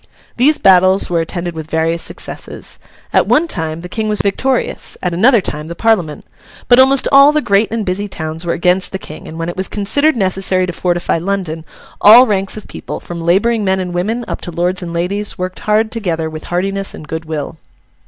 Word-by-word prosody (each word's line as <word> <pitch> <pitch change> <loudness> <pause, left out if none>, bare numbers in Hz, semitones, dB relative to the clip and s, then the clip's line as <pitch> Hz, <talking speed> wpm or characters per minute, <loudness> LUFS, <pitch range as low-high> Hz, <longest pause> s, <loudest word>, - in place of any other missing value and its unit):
These 290 +5 +3
battles 185 0 +4
were 170 -1 +2
attended 175 +1 -4
with 160 -1 -8
various 165 +1 0
successes. - - -7 0.3
At - - +3
one 325 +3 +3
time, 160 - -3
the 180 - -7
King 215 +3 -3
was 210 - +1
victorious; 255 +6 -1
at 180 -2 -1
another 225 +6 +4
time, 150 -2 -5
the 170 - -7
Parliament. 180 -8 0 0.4
But 245 0 +6
almost 265 +1 +5
all 275 +1 +7
the 305 - +1
great 205 -5 +2
and 225 -1 -3
busy 190 +3 -2
towns 160 -3 -5
were 170 - -1
against 180 +2 0
the - - -1
King; 155 -4 -10
and 160 - -9
when 165 0 -3
it 175 - -4
was 190 0 -1
considered 285 +10 +1
necessary 190 -2 +1
to 180 - -5
fortify 175 -1 -1
London, 170 -3 -3 0.4
all 230 +5 +9
ranks 195 -3 -1
of 215 - -9
people, - - -7
from 170 -1 -7
labouring 205 +7 +2
men 190 -1 +1
and 180 -1 -4
women, 220 +7 -2
up - - -5
to - - -5
lords 180 +3 -1
and 175 -2 -6
ladies, 190 +5 -2
worked 185 0 -5
hard 215 +1 +1
together 165 -8 -2
with 155 0 -8
heartiness 195 +2 -2
and 155 - -11
good 160 +1 -5
will. 155 0 -5
185 Hz, 205 wpm, -15 LUFS, 170-215 Hz, 0.4 s, all